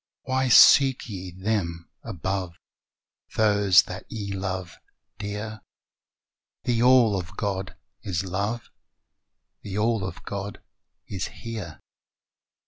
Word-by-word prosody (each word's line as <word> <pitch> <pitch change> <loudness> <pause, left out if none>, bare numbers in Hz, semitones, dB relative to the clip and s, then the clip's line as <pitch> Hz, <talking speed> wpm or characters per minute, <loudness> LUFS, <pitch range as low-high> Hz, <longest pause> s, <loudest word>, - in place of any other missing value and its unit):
Why 130 0 0
seek 135 +1 +7
ye 95 -4 -6
them 90 -3 -2
above, 95 -3 -4 0.8
Those 105 -4 +5
that - - -8
ye 100 -3 -4
love 95 -2 -4 0.4
dear? 105 +1 -5 1.0
The 120 -2 +1
All 125 -4 +5
of 85 -1 -9
God 95 -2 -3 0.2
is 90 -2 -2
Love, 100 +6 -3 0.9
The 100 -1 -6
All 110 -1 +1
of 95 - -6
God 100 0 -5 0.5
is 95 -2 -3
Here. 110 -9 -7
100 Hz, 105 wpm, -25 LUFS, 95-110 Hz, 1.0 s, seek